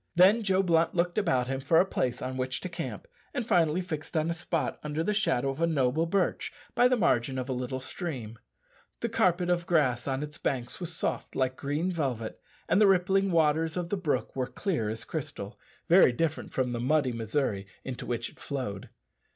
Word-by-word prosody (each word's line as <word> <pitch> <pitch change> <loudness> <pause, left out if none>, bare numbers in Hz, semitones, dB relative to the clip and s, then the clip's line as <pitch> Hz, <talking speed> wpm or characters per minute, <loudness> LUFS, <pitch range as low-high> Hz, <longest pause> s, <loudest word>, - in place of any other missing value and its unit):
Then 190 +6 +6
Joe 195 -2 +2
Blunt 165 -2 +2
looked 175 +3 +1
about 165 -11 +2
him 135 +1 -2
for 155 +5 +4
a - - +5
place 125 -11 -2
on 130 0 -3
which 130 0 -2
to 185 - -4
camp, 180 - -6 0.3
and 250 -4 -1
finally 170 -3 +3
fixed 160 -2 -4
on 160 +2 +1
a - - +1
spot 165 0 -2
under 150 +1 -2
the 210 - +1
shadow 140 - +1
of 135 - -7
a 170 - +4
noble 155 +1 +1
birch 190 +2 0 0.2
by 245 - +5
the 250 0 +2
margin 130 - +2
of 130 0 -3
a 130 - -1
little 125 +1 -3
stream. 130 - -6 0.6
The - - 0
carpet 180 0 +2
of 175 -1 0
grass 135 -8 +2
on 135 +1 -1
its 150 +1 -8
banks 125 -2 -2
was 175 -2 -4
soft 165 - -3
like 130 -1 +1
green 145 +7 -1
velvet, 130 -10 -3 0.3
and 185 - +3
the 210 - +7
rippling 195 +1 +3
waters 160 0 +2
of 175 -1 -2
the 205 - 0
brook 180 -7 -1
were 130 -2 -1
clear 155 - -2
as 110 +1 -4
crystal - - -5 0.3
very - - +7
different 155 +4 -2
from 130 -2 0
the 120 - -2
muddy 135 +1 +2
Missouri 110 -3 -1 0.2
into 130 -2 -5
which 120 -1 -2
it - - -22
flowed. 125 -9 -4
155 Hz, 205 wpm, -29 LUFS, 130-175 Hz, 0.6 s, the